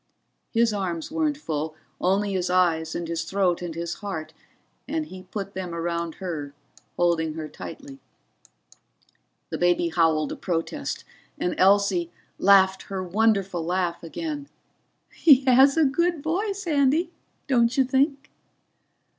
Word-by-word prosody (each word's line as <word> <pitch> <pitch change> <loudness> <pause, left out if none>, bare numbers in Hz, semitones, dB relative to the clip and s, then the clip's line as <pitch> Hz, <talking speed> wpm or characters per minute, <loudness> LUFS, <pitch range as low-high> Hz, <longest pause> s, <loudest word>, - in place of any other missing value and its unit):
His 230 -1 +2
arms 180 - -3
weren't 310 -2 0
full 155 - -4 0.2
only 195 +2 +1
his 180 -1 -1
eyes 165 -3 +2
and 170 - -3
his 165 0 -2
throat 180 0 0
and 170 -2 -5
his 170 0 -3
heart 190 -7 -6 0.5
and 315 +1 -2
he 185 -7 -11
put 200 -1 -5
them 180 -2 -5
around 170 -1 -2
her, 155 -7 -5 0.4
holding 165 -3 +1
her 160 -1 -5
tightly. 275 - -10 1.5
The - - -3
baby 175 -1 +2
howled 160 -3 +2
a - - -3
protest, 165 -3 -3 0.3
and 180 - -1
Elsie, 190 -3 +3 0.3
laughed 190 -1 +5
her 190 -1 -3
wonderful 195 -2 +1
laugh 175 0 -1
again. 290 - -5 0.6
"He 275 -4 +5
has 265 +3 +6
a 320 - +5
good 335 +2 +1
voice, 395 +4 -2
Andy, 305 +2 +2 0.3
don't 240 -1 +2
you 265 - +6
think?" 275 +2 0
190 Hz, 135 wpm, -25 LUFS, 170-270 Hz, 1.5 s, has